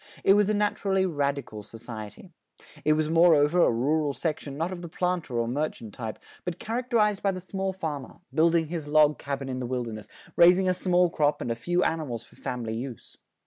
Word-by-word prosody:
It 195 - +6
was 205 0 +3
a 215 - +2
naturally 200 -2 +1
radical 140 - -2
society. 110 - -10 0.5
It 155 - +4
was 155 0 0
moreover 165 0 +5
a - - +5
rural 145 +5 +1
section 145 -3 -3
not 165 +4 -1
of 180 -2 -6
the 170 - -7
planter 175 -7 -2
or 115 0 0
merchant 120 -5 -3
type, 110 -3 -5 0.3
but 175 -1 -4
characterized 225 -3 0
by 200 - +2
the 185 -1 -2
small 190 +1 -3
farmer, 155 -7 -5 0.2
building 165 0 +3
his 160 -3 -4
log 150 0 +4
cabin 140 -1 -4
in 130 -1 -3
the 125 - -3
wilderness, 120 -4 -4 0.3
raising 180 +2 +6
a 185 - +3
small 180 -1 +2
crop 150 -2 +1
and 120 - -3
a - - +2
few 175 +9 0
animals 140 -8 -2
for - - -21
family 120 -3 -4
use. 120 -1 -7
155 Hz, 190 wpm, -27 LUFS, 130-180 Hz, 0.5 s, It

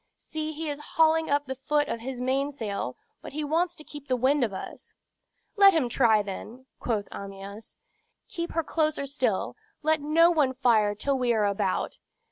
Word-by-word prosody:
"See, 310 0 -5
he 315 +1 -5
is 290 -1 -3 0.2
hauling 320 0 +4
up 285 0 +2
the 265 - -3
foot 290 +2 0
of 230 - -3
his 250 +2 -6
mainsail; 255 - -2 0.2
but - - -9
he 305 +1 -2
wants 335 +4 0
to 305 - -11
keep 290 -2 -11
the 255 - +2
wind 265 +3 +2
of 225 - 0
us." 190 - -8 0.6
"Let 395 -2 +8
him 270 -7 +1
try, 225 -4 +4
then," 220 +6 -8
quoth 215 -4 -1
Amyas. 200 +2 -8 0.5
"Keep 340 -4 -5
her 330 - 0
closer 310 -2 0
still. 280 +1 -1 0.3
Let 310 0 +2
no 330 +4 +5
one 285 -6 +2
fire 220 -5 +3
till 270 +5 -1
we 245 -2 +2
are 215 -2 +2
about. 200 -1 -1
270 Hz, 180 wpm, -27 LUFS, 225-310 Hz, 0.6 s, Let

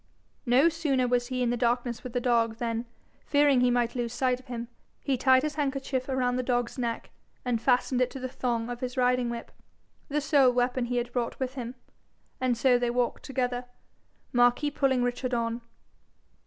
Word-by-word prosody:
No 255 +6 +5
sooner 295 -6 +1
was 245 0 +1
he 255 -1 -1
in 240 - +1
the - - +1
darkness 240 0 0
with 250 - -7
the 245 - +1
dog, 235 -2 +2
than, 230 0 -2 0.4
fearing 285 -3 +4
he 250 - +4
might 240 -1 +1
lose 240 -2 -2
sight 255 0 +1
of 255 - -19
him, 235 -1 -5 0.3
he 275 - 0
tied 260 +1 +4
his 305 -1 -1
handkerchief 275 -2 -2
round 255 -1 0
the - - +2
dog's 245 -1 -1
neck, 235 -2 -3 0.3
and 240 -3 0
fastened 250 0 +2
to 255 - +4
it 265 - -9
the 255 - -3
thong 240 -3 -2
of 240 - -5
his 255 +1 -5
riding 250 -1 +2
whip 235 0 -6 0.6
the 295 +1 +1
sole 280 -3 +4
weapon 245 0 0
he 245 0 -2
had 240 0 -2
brought 240 -2 -2
with 260 -1 -2
him 250 -2 -6 0.6
and 255 -2 +1
so 245 0 +4
they 245 -1 0
walked 245 0 0
together, 250 -2 -2 0.7
Marquis 245 +4 +3
pulling 265 -3 +1
Richard 245 +1 -1
on. 230 0 -1
250 Hz, 195 wpm, -28 LUFS, 240-260 Hz, 0.7 s, No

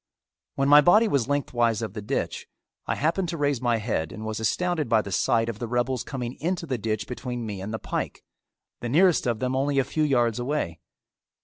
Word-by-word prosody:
When 135 0 +1
my 145 +1 +8
body 210 +8 +5
was 140 - +1
lengthwise 120 -6 0
of 110 - -4
the 105 - -5
ditch 125 +7 -3 0.4
I - - 0
happened 170 +4 0
to 170 - -3
raise 145 -4 0
my 120 -2 +2
head 105 -8 -2
and 110 - -7
was 110 0 -3
astounded 160 - 0
by 110 -2 +3
the 100 - -7
sight 115 +4 +2
of 115 -2 -4
the 120 - -3
rebels 120 +1 0
coming 125 -3 -5
into 175 +2 -2
the 130 -6 -2
ditch 110 -1 -2
between 125 -1 -5
me 100 -3 -5
and 100 +3 -5
the 110 - -2
pike, - - -4 0.6
the 120 - -4
nearest 170 0 +4
of 120 -2 +1
them 130 +3 -1
only 140 +1 0
a 135 - +4
few 155 - -3
yards 120 -6 +2
away. 120 - -2
125 Hz, 215 wpm, -26 LUFS, 110-145 Hz, 0.6 s, my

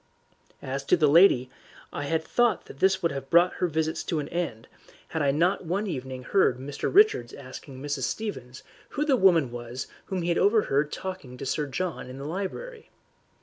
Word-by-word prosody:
As 135 +1 -3
to 180 - +4
the 155 - +3
lady, 140 -5 +5 0.4
I 145 - -3
had 160 +2 0
thought 240 +6 +1
that 135 - -13
this 190 +1 +2
would 170 - +2
have 135 -1 -6
brought 175 +2 +5
her 180 - +1
visits 160 0 -1
to 165 - -1
an 150 - -3
end, 165 -10 -3 0.4
had 160 -2 -2
I 140 - +2
not 170 +8 +1
one 190 +6 -1
evening 130 -7 -5
heard 160 -6 +2
Mr. 140 +2 -4
Richards 390 - +4
asking 130 0 -10
Mrs. 145 -3 -2
Stevens 140 - -5 0.3
who 295 - +1
the 285 -3 +4
woman 170 - +4
was 120 +2 -6 0.2
whom 185 -3 -3
he 170 - -1
had 170 - +2
overheard 155 -9 +2
talking 185 -10 -6
to - - -6
Sir 145 +2 -1
John 165 -1 -4
in 130 - -8
the 140 - -7
library. 200 - -5
160 Hz, 190 wpm, -27 LUFS, 135-185 Hz, 0.4 s, lady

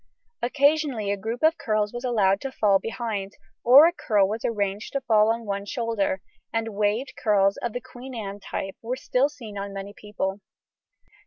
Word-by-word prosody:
Occasionally 280 -4 +2
a - - +1
group 225 +6 -5
of 320 +1 +4
curls 215 -5 0
was 240 +1 -5
allowed 205 -6 +2
to 270 - -4
fall 205 -6 +3
behind, 220 -4 -4 0.3
or 265 +6 +9
a 345 - +3
curl 205 - +2
was 220 +3 -4
arranged 205 -2 -2
to 275 - -1
fall 220 -3 +4
on 230 0 -3
one 200 -1 -2
shoulder, 220 -5 -1 0.3
and 225 0 -1
waved 215 +6 0
curls 200 -2 +2
of 240 - -3
the 245 - -3
Queen 255 0 -10
Anne 205 -3 -5
type 195 -1 -5
were 240 +3 -3
still 260 +1 +1
seen 225 -9 -9
on 200 0 -5
many 200 +1 -6
people. 205 -2 -4
220 Hz, 180 wpm, -25 LUFS, 200-250 Hz, 0.3 s, or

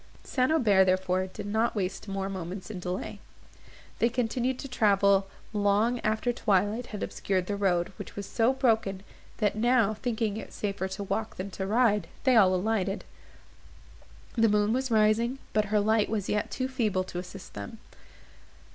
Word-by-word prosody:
St. 255 +1 +1
Aubert, 210 -11 +4
therefore, 185 0 +1
did 200 +2 -8
not 220 +3 0
waste 195 0 -3
more 195 -1 -2
moments 185 0 -6
in 185 - -6
delay. 180 +3 -4 0.8
They 235 - +3
continued 250 +1 -1
to 275 - -6
travel 200 -5 +3 0.3
long 210 +4 +2
after 220 +3 0
twilight 210 +2 +1
had 210 - -5
obscured 185 -2 -1
the 205 - -2
road, 185 -2 +1
which - - -8
was 200 - -5
so 230 +4 +2
broken, 220 -7 +1 0.3
that, 210 -3 +1
now 230 -1 +3
thinking 220 -2 -2
it - - -8
safer 200 -2 -2
to 190 +1 -5
walk 220 +3 -3
than 195 +2 -5
to 190 0 -4
ride, 215 -1 +2 0.2
they 260 -2 +4
all 190 -4 +6
alighted. 195 0 -1 1.3
The 225 -2 +4
moon 210 +1 +2
was 260 +1 -1
rising, 225 +3 +3 0.2
but 215 0 +2
her 210 +1 +1
light 215 +1 +2
was 210 -3 -2
yet 210 - 0
too 260 - -2
feeble 220 -8 0
to 180 -1 -6
assist 180 +1 -9
them. 100 -1 -7
210 Hz, 165 wpm, -28 LUFS, 195-230 Hz, 1.3 s, all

